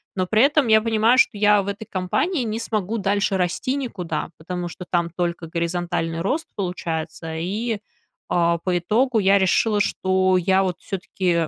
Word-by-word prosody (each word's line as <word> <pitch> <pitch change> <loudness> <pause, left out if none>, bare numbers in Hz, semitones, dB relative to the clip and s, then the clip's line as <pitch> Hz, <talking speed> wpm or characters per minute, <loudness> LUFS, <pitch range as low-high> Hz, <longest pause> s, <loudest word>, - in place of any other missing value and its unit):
Но 185 -1 0
при 220 +3 +3
этом 290 -2 +3
я 220 0 +5
понимаю, 225 +2 +3
что 225 -4 +3
я 205 0 +4
в - - -9
этой 205 +2 -5
компании 240 - -1
не 220 0 -3
смогу 220 -1 -2
дальше 200 0 0
расти 180 +9 -1
никуда, 205 -15 -4
потому 175 +2 -5
что 180 - -9
там 170 -1 +1
только 170 -1 -3
горизонтальный 170 0 -2
рост 300 - -1
получается. 165 -3 -4
И, 210 +6 -2 0.5
а, 170 -1 +2
по 180 0 0
итогу, 225 +7 +1
я 195 0 +4
решила, 205 +3 +2
что 185 -1 +2
я 190 +2 +2
вот 180 -1 -2
всё-таки, 180 -4 -1
190 Hz, 165 wpm, -22 LUFS, 175-220 Hz, 0.5 s, я